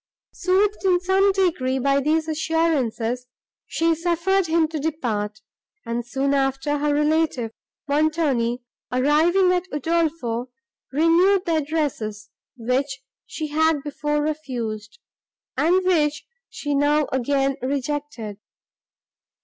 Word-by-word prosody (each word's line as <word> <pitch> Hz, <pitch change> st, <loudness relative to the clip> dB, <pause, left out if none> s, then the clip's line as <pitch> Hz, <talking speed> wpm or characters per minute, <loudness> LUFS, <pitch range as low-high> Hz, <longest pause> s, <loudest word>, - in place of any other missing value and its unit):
Soothed, 390 Hz, +3 st, +1 dB
in 365 Hz, -2 st, +3 dB
some 380 Hz, +2 st, +3 dB
degree, 335 Hz, -9 st, +1 dB
by 275 Hz, +1 st, +2 dB
these 315 Hz, +3 st, +1 dB
assurances, 285 Hz, -7 st, 0 dB, 0.4 s
she 330 Hz, 0 st, +1 dB
suffered 345 Hz, +3 st, +1 dB
him 325 Hz, 0 st, +2 dB
to 315 Hz, -1 st, -4 dB
depart; 225 Hz, -9 st, -2 dB, 0.4 s
and, 235 Hz, +1 st, -2 dB
soon 270 Hz, +4 st, -1 dB
after, 270 Hz, +1 st, 0 dB
her 295 Hz, 0 st, +1 dB
relative, 300 Hz, -5 st, +1 dB, 0.4 s
Montoni, 285 Hz, -5 st, +1 dB, 0.3 s
arriving 315 Hz, +8 st, +3 dB
at 365 Hz, +1 st, -1 dB
Udolpho, 295 Hz, -6 st, -1 dB, 0.4 s
renewed 345 Hz, +6 st, +3 dB
the 330 Hz, -2 st, +1 dB
addresses, 280 Hz, -9 st, -3 dB, 0.3 s
which 260 Hz, +3 st, -1 dB, 0.2 s
she 310 Hz, -1 st, -5 dB
had 315 Hz, -1 st, +2 dB
before 295 Hz, 0 st, -1 dB
refused, 250 Hz, -, -4 dB, 0.6 s
and 365 Hz, +3 st, +2 dB
which 300 Hz, -5 st, +1 dB, 0.2 s
she 290 Hz, -1 st, -4 dB
now 290 Hz, +1 st, +3 dB
again 270 Hz, +1 st, +1 dB
rejected. 265 Hz, -5 st, -3 dB
295 Hz, 110 wpm, -23 LUFS, 260-330 Hz, 0.6 s, in